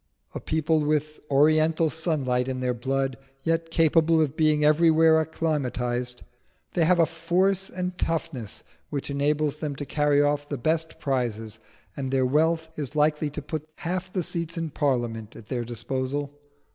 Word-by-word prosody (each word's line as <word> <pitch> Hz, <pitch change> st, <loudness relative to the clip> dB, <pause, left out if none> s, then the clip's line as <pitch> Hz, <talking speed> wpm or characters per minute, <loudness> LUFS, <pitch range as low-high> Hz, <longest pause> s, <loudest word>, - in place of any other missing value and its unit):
A -, -, -4 dB
people 160 Hz, 0 st, +1 dB
with 150 Hz, 0 st, -1 dB
oriental 155 Hz, +3 st, +4 dB
sunlight 135 Hz, -6 st, 0 dB
in 130 Hz, -1 st, -3 dB
their 125 Hz, -1 st, 0 dB
blood, 135 Hz, +2 st, -1 dB, 0.3 s
yet 165 Hz, 0 st, 0 dB
capable 165 Hz, 0 st, +3 dB
of 150 Hz, -2 st, +1 dB
being 155 Hz, -1 st, +3 dB
everywhere 160 Hz, +1 st, +5 dB
acclimatised, 125 Hz, -6 st, -2 dB, 0.5 s
they 170 Hz, -3 st, +3 dB
have 180 Hz, +2 st, +4 dB
a 165 Hz, -, +5 dB
force 180 Hz, +4 st, 0 dB
and 180 Hz, 0 st, -4 dB
toughness 140 Hz, -9 st, -3 dB, 0.3 s
which 140 Hz, -1 st, -4 dB
enables 150 Hz, +1 st, 0 dB
them 150 Hz, -2 st, -4 dB
to 145 Hz, -, -5 dB
carry 145 Hz, +1 st, +2 dB
off 145 Hz, 0 st, +1 dB
the 145 Hz, -, -2 dB
best 160 Hz, +5 st, -1 dB
prizes; 115 Hz, -5 st, -2 dB, 0.4 s
and 135 Hz, -2 st, -3 dB
their 130 Hz, -1 st, +2 dB
wealth 160 Hz, +4 st, +1 dB
is 145 Hz, 0 st, -4 dB
likely 150 Hz, 0 st, +2 dB
to 145 Hz, 0 st, -7 dB
put 155 Hz, +1 st, -5 dB
half 185 Hz, +2 st, -3 dB
the 185 Hz, -2 st, -1 dB
seats 170 Hz, +1 st, -4 dB
in 165 Hz, -2 st, -3 dB
Parliament 120 Hz, -7 st, -1 dB
at 110 Hz, -, -13 dB
their 120 Hz, -2 st, -1 dB
disposal." 130 Hz, +4 st, -3 dB
150 Hz, 160 wpm, -26 LUFS, 135-160 Hz, 0.5 s, everywhere